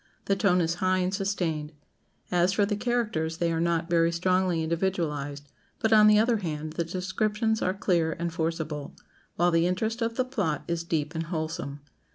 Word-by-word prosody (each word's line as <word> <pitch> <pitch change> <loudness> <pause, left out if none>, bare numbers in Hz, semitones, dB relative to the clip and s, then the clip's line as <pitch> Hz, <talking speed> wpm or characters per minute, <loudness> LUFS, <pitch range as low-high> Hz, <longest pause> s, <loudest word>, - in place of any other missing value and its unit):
The 195 - +2
tone 195 -3 +3
is 165 0 +1
high 185 0 +3
and 185 0 0
sustained. 175 -6 -2 0.6
As 180 +1 +3
for 205 0 +3
the 205 +1 -1
characters, 210 -9 -1
they 170 0 0
are 165 - 0
not 170 -1 +1
very 170 -1 +3
strongly 180 -1 +1
individualized; 160 -5 -2 0.3
but, 220 -1 +1
on 215 -1 +7
the 210 0 +6
other 225 +2 +3
hand, 155 -5 -4
the 170 - -1
descriptions 210 +5 -1
are 185 +1 0
clear 170 -5 +1
and 170 +1 -4
forcible, 160 -3 -3 0.4
while 175 +1 +3
the 165 +1 +3
interest 220 +6 -1
of 230 0 -1
the 255 - +1
plot 205 - -2
is 170 -1 -2
deep 160 -2 -2
and 165 0 -3
wholesome. 160 -3 -4
175 Hz, 185 wpm, -27 LUFS, 160-200 Hz, 0.6 s, on